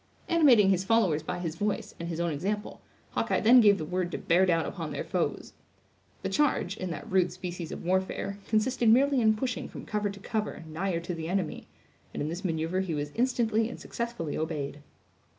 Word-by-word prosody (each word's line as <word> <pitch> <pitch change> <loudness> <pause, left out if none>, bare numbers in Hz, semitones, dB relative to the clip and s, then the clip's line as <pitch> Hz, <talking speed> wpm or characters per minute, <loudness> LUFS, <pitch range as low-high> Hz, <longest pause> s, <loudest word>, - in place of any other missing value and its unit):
Animating 255 - +6
his 185 -1 +1
followers 190 -7 +2
by 180 +3 -4
his 170 -3 -3
voice, 205 +4 -2
and 170 0 -4
his 165 -1 -4
own 170 -1 0
example, 200 +8 -3 0.3
Hawkeye - - 0
then 245 +3 +8
gave 205 -2 +6
the 155 - -4
word 180 +1 -2
to - - -2
bear 180 +3 +3
down 165 -2 +2
upon - - -5
their - - -3
foes. - - -2 0.7
The - - 0
charge, 265 -10 +1
in 185 -3 -4
that 170 - -6
rude 185 -2 +2
species 175 -2 -6
of - - -7
warfare, 190 +2 -1
consisted 230 +2 +2
merely 265 +3 +5
in 220 -1 +4
pushing 245 +2 -3
from - - -9
cover 210 -1 -1
to 200 0 -8
cover, 210 -3 -3
nigher 170 +2 -2
to 175 +1 -4
the 160 -1 -5
enemy; 185 -4 -2 0.5
and - - -2
in 150 - -2
this 175 +4 -5
maneuver 165 0 -1
he 185 -4 -1
was 145 0 -3
instantly 230 -2 +1
and - - -8
successfully 235 -10 -4
obeyed. 150 -3 -3
190 Hz, 200 wpm, -29 LUFS, 170-220 Hz, 0.7 s, then